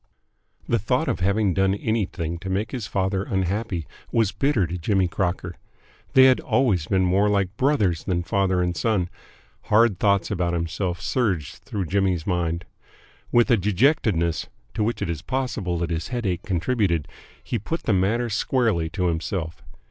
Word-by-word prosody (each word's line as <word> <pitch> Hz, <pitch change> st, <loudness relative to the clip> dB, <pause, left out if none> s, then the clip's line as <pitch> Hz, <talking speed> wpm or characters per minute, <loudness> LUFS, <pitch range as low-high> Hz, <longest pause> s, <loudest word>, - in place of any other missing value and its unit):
The -, -, +2 dB
thought -, -, 0 dB
of -, -, -1 dB
having 100 Hz, +1 st, +2 dB
done 95 Hz, +1 st, +2 dB
anything 95 Hz, -7 st, -2 dB
to 95 Hz, +1 st, -6 dB
make 100 Hz, +3 st, -1 dB
his 125 Hz, -7 st, -4 dB
father 95 Hz, 0 st, 0 dB
unhappy 95 Hz, -2 st, -2 dB, 0.3 s
was 110 Hz, -4 st, +2 dB
bitter 135 Hz, -9 st, +1 dB
to 85 Hz, -, -4 dB
Jimmy 95 Hz, +2 st, +2 dB
Crocker. 90 Hz, 0 st, -2 dB, 0.6 s
They 130 Hz, -, +8 dB
had 130 Hz, -1 st, +6 dB
always 95 Hz, -, +1 dB
been 95 Hz, -1 st, +2 dB
more 95 Hz, +3 st, +3 dB
like 100 Hz, -2 st, 0 dB
brothers 105 Hz, -, +1 dB
than 90 Hz, -3 st, 0 dB
father 95 Hz, -1 st, +1 dB
and 90 Hz, 0 st, -1 dB
son. 95 Hz, -1 st, 0 dB, 0.6 s
Hard 105 Hz, -3 st, +4 dB
thoughts 100 Hz, -1 st, +2 dB
about 90 Hz, -3 st, 0 dB
himself 85 Hz, +1 st, -2 dB
surged 95 Hz, -, -1 dB
through 100 Hz, -3 st, -4 dB
Jimmy's 95 Hz, -2 st, 0 dB
mind. 85 Hz, -2 st, -1 dB, 0.7 s
With 120 Hz, +2 st, +4 dB
a 120 Hz, -, +6 dB
dejectedness 100 Hz, -, +1 dB, 0.3 s
to 110 Hz, -, 0 dB
which 115 Hz, +3 st, -1 dB
it -, -, -3 dB
is 80 Hz, -3 st, -5 dB
possible 115 Hz, -6 st, -2 dB
that 85 Hz, 0 st, -2 dB
his 80 Hz, -1 st, -2 dB
headache 105 Hz, -9 st, -2 dB
contributed 90 Hz, -3 st, 0 dB, 0.4 s
he -, -, -2 dB
put 165 Hz, -, -4 dB
the 110 Hz, -, +1 dB
matter 105 Hz, +6 st, +1 dB
squarely 110 Hz, -6 st, +1 dB
to 90 Hz, +2 st, -2 dB
himself. 85 Hz, 0 st, -2 dB
95 Hz, 165 wpm, -24 LUFS, 85-110 Hz, 0.7 s, They